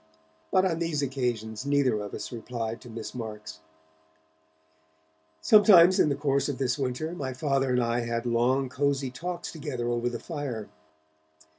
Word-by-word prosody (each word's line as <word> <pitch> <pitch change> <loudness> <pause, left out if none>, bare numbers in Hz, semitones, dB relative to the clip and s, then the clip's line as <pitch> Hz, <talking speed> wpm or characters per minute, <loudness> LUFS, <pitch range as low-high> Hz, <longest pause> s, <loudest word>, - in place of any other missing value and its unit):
But 185 0 +3
on 165 -3 0
these 165 -4 -1
occasions 120 -5 -2
neither 140 -6 +2
of 105 -1 -6
us - - -6
replied 115 -1 -5
to 120 - -12
Miss 115 -1 -7
Marks. 105 -9 -7 1.8
Sometimes 190 - +7
in - - +4
the 140 - 0
course 140 0 0
of 140 - -3
this 130 -1 0
winter, 135 +4 -2
my 135 -7 -4
Father 135 0 0
and 125 -1 +2
I 115 +1 0
had 115 0 -2
long 125 +3 +2
cosy 140 0 -1
talks 175 +6 -5
together 140 -7 -4
over 120 0 0
the 120 - -4
fire. 140 - -5
130 Hz, 155 wpm, -27 LUFS, 120-145 Hz, 1.8 s, Sometimes